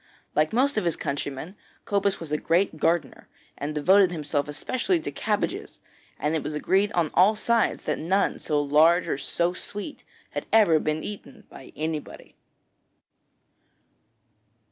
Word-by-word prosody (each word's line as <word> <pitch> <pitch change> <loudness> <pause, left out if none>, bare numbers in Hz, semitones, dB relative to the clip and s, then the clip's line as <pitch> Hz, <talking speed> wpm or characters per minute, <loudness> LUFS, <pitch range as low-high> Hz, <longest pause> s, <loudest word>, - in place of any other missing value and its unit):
Like 155 +1 +2
most 260 +2 +1
of 215 - +1
his 170 - +1
countrymen, 145 +5 -4 0.3
Cobus 200 -1 0
was 165 -3 -8
a 150 - +1
great 170 0 +1
gardener, 165 +2 -1 0.3
and 150 +2 -5
devoted 185 +5 +5
himself 150 -3 -2
especially 255 - -1
to 320 - -5
cabbages, - - -2 0.4
and 150 +2 -1
it 160 - 0
was 150 +2 -5
agreed 195 +7 +1
on 165 -4 +1
all 195 +4 +5
sides 230 +1 +1
that - - -2
none 190 +5 +1
so 150 -1 0
large 155 +5 +4
or 135 - -2
so 170 +4 -1
sweet 205 +9 -8 0.3
had - - -5
ever 205 -8 +5
been 155 +1 -2
eaten 220 +3 -8
by 130 - -12
anybody. 155 -1 -5
170 Hz, 145 wpm, -25 LUFS, 150-205 Hz, 0.4 s, devoted